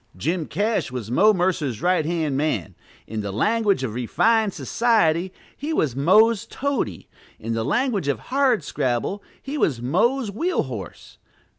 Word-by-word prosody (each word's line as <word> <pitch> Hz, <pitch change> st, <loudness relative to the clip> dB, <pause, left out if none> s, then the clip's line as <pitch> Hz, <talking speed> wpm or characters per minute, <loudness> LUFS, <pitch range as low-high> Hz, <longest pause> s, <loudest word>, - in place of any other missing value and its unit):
Jim 160 Hz, -, -1 dB
Cash 210 Hz, -, -1 dB
was 120 Hz, -3 st, -5 dB
Mo 210 Hz, -, +5 dB
Mercer's 175 Hz, -, 0 dB
right 180 Hz, -2 st, +2 dB
hand 160 Hz, -5 st, -1 dB
man: 140 Hz, -, -1 dB, 0.3 s
in 110 Hz, 0 st, -4 dB
the 100 Hz, -1 st, -4 dB
language 205 Hz, -, +1 dB
of 115 Hz, -5 st, -3 dB
refined 215 Hz, -, +2 dB
society, 180 Hz, -, +1 dB, 0.2 s
he 300 Hz, +3 st, -4 dB
was 145 Hz, -, 0 dB
"Mo's 215 Hz, -, +4 dB
toady;" 260 Hz, -, -3 dB, 0.3 s
in 115 Hz, +1 st, -4 dB
the 115 Hz, 0 st, -1 dB
language 220 Hz, -, 0 dB
of 140 Hz, -4 st, +1 dB
Hardscrabble, 200 Hz, -, 0 dB, 0.2 s
he 285 Hz, +2 st, -5 dB
was 135 Hz, -, +1 dB
"Mo's 210 Hz, -, +1 dB
wheel 335 Hz, -, 0 dB
horse." 115 Hz, -, -9 dB
175 Hz, 145 wpm, -23 LUFS, -, 0.3 s, Mo